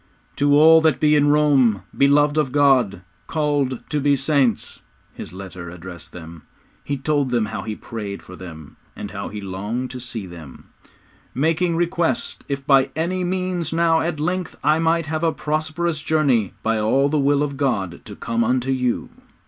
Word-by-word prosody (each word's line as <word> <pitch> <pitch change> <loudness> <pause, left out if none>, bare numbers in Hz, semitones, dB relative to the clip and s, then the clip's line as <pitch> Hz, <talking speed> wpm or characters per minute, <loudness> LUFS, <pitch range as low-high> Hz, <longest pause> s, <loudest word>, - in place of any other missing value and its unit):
'To 145 0 +3
all 160 +1 +7
that 160 -3 +2
be 150 0 +4
in 145 0 +4
Rome, 140 -8 +3
beloved 145 +1 +4
of 150 -4 +1
God, 130 -9 +3 0.3
called 145 -5 -1
to 150 - 0
be 145 0 +3
saints,' 135 -4 0 0.3
his - - -9
letter 90 -2 -9
was 85 - -8
addressed. 90 0 -10 0.7
He 140 - -3
told 140 0 0
them 120 -3 +1
how 110 -1 -5
he 110 +1 -5
prayed 105 -4 -7
for 90 - -11
them, 80 -5 -11 0.2
and - - -7
how - - -5
he 105 - -6
longed 105 +6 -4
to 125 - -7
see 120 -4 -6
them 85 -7 -12 0.7
'_Making 165 +5 +1
request, 175 0 -1
if 140 -1 -3
by 135 -2 +4
any 180 +4 -1
means 180 -2 -2
now 165 -1 +3
at 165 -2 -2
length 180 +3 -2
I 155 +2 +3
might 165 0 +1
have 155 +1 -3
a 165 - +3
prosperous 155 +1 -2
journey 135 -11 +1
by 115 0 +1
the 135 +7 +2
will 145 +1 +2
of 140 -1 -3
God 100 -11 -1
to - - -10
come 115 0 -1
unto 125 +2 0
you. 125 -2 -1
140 Hz, 175 wpm, -21 LUFS, 115-155 Hz, 0.7 s, all